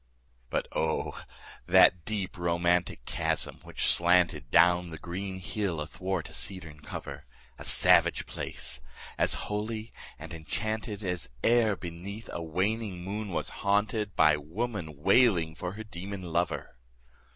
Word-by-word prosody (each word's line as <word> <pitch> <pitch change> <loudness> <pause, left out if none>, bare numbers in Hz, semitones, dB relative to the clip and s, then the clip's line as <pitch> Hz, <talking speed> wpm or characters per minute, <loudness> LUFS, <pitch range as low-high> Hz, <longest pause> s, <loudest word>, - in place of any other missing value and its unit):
But - - -1
O, 80 0 0 0.5
that 85 -3 +6
deep 105 -4 -3
romantic 85 -5 +1
chasm 80 -5 -2
which - - -3
slanted 85 -6 +4
Down 85 +3 +5
the 80 - -7
green 95 +4 -5
hill 95 -2 -2
athwart 90 +3 -3
a - - -12
cedarn 85 -6 -6
cover! - - -7 0.3
A - - -7
savage - - +4
place! 65 -2 -6 0.4
as - - +4
holy 110 +2 -3 0.2
and 80 +2 -9
enchanted 105 - -3
As 90 -2 -2
e'er 115 -3 +4
beneath 95 +5 -7
a 85 - -3
waning 95 +3 -1
moon 105 +2 -4
was 90 - -2
haunted 105 +2 +2
15 100 - -25
By 75 -1 +5
woman 80 -2 -4
wailing 95 -6 +4
for 90 +4 -5
her 110 +2 -7
demon 100 -1 -7
lover! 85 -7 -2
90 Hz, 135 wpm, -29 LUFS, 80-105 Hz, 0.5 s, that